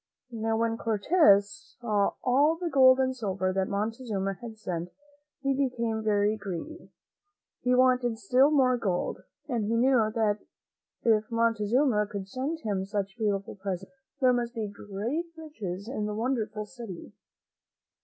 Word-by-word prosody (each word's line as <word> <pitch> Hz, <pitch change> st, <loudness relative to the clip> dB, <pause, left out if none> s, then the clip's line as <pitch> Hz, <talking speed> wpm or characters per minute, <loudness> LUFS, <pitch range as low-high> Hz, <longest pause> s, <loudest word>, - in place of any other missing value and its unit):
Now, 225 Hz, -1 st, -1 dB
when 225 Hz, 0 st, 0 dB
Cortez 225 Hz, -, +3 dB
saw 210 Hz, -4 st, +1 dB
all 285 Hz, +6 st, +4 dB
the 340 Hz, 0 st, -4 dB
gold 260 Hz, -1 st, +6 dB
and 260 Hz, 0 st, +1 dB
silver 190 Hz, -5 st, -1 dB
that 190 Hz, 0 st, 0 dB
Montezuma 210 Hz, -1 st, -2 dB
had 225 Hz, +3 st, -10 dB
sent, 175 Hz, -4 st, -4 dB, 0.5 s
he 275 Hz, 0 st, +2 dB
became 240 Hz, -5 st, -1 dB
very 210 Hz, 0 st, +2 dB
greedy. 215 Hz, -, -7 dB, 0.7 s
He 250 Hz, 0 st, +2 dB
wanted 250 Hz, -2 st, +3 dB
still 250 Hz, +7 st, +4 dB
more 260 Hz, -4 st, +3 dB
gold, 190 Hz, -6 st, -2 dB, 0.3 s
and 235 Hz, -6 st, -1 dB
he 225 Hz, +2 st, 0 dB
knew 235 Hz, -2 st, +3 dB
that 215 Hz, -2 st, +1 dB, 0.6 s
if 220 Hz, -2 st, +2 dB
Montezuma 230 Hz, 0 st, +2 dB
could 200 Hz, -2 st, -6 dB
send 275 Hz, +10 st, -3 dB
him 200 Hz, -4 st, -1 dB
such 195 Hz, 0 st, -3 dB
beautiful 205 Hz, -3 st, -1 dB
presents, 190 Hz, +1 st, -5 dB, 0.3 s
there 255 Hz, -2 st, +4 dB
must 240 Hz, 0 st, -2 dB
be 220 Hz, -2 st, -2 dB
great 210 Hz, -, -4 dB
riches 210 Hz, -, -6 dB
in 215 Hz, -4 st, -3 dB
the 210 Hz, -, -3 dB
won 240 Hz, +5 st, 0 dB
derful 215 Hz, -3 st, -3 dB
city. 215 Hz, -6 st, -9 dB
225 Hz, 145 wpm, -28 LUFS, 205-255 Hz, 0.7 s, gold